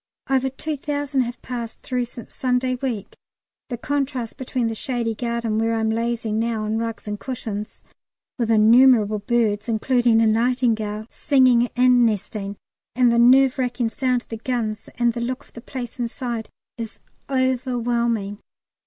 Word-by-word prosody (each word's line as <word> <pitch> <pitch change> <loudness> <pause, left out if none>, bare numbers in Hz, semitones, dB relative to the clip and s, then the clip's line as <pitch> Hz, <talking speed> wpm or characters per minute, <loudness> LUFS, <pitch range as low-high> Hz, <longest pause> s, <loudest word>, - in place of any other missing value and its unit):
Over 265 0 +2
two 300 +3 -4
thousand 285 -1 -1
have 240 0 -4
passed 235 -2 -6
through 250 -1 -1
since 235 0 -11
Sunday 255 0 0
week. 245 -5 -4 0.6
The 240 - -3
contrast 265 -3 -2
between 255 -2 -2
the 225 - -1
shady 235 -1 -1
garden 235 -1 -1
where 225 0 +1
I'm 220 0 +1
lazing 230 -1 -1
now 225 -1 -1
on 215 +1 -1
rugs 230 -1 -4
and 210 0 -3
cushions, 220 -5 -5 0.6
with 230 -2 0
innumerable 220 -1 +5
birds, 215 0 0
including 235 0 +3
a 225 - +4
nightingale, 220 -2 +1
singing 255 -4 +3
and 250 0 +5
nesting, 205 -2 -1 0.4
and 250 -1 +4
the 235 - +3
nerve 260 +2 +6
racking 245 -2 0
sound 250 0 0
of - - -37
the 225 - -4
guns 225 -3 -3
and 240 0 +2
the 235 - -4
look 255 +4 -3
of - - -27
the 235 - -9
place 250 0 -7
inside, 235 -1 -3 0.3
is 225 -1 -6 0.3
overwhelming. 240 -5 0
235 Hz, 155 wpm, -23 LUFS, 225-255 Hz, 0.6 s, nerve